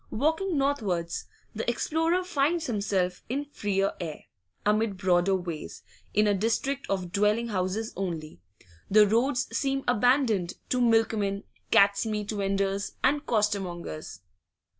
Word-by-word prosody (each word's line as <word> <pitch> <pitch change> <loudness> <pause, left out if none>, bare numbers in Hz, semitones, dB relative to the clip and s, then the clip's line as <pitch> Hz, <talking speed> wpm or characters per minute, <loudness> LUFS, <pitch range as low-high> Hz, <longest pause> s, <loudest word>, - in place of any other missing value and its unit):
Walking 320 - 0
northwards, 210 -12 -1 0.3
the 225 +2 -2
explorer 325 +8 +1
finds 325 -1 0
himself 195 -5 -1
in 280 +4 -1
freer 200 -8 -1
air, 160 -3 -5 0.4
amid 210 -1 +1
broader 185 0 +3
ways, 175 -4 -6 0.3
in 210 - +3
a 205 - +3
district 230 +7 -1
of 185 -3 -2
dwelling 210 +4 +2
houses 200 +3 -2
only; 165 - -4 0.5
the 210 +1 +7
roads 245 +5 +1
seem 270 -1 0
abandoned 245 -6 +2 0.2
to 250 - +1
milkmen, 220 -4 +2 0.3
cat's 200 -1 +4
meat 210 -1 -2
vendors, 195 -1 -1
and 290 +2 +2
costermongers. 195 - -2
210 Hz, 120 wpm, -27 LUFS, 195-250 Hz, 0.5 s, the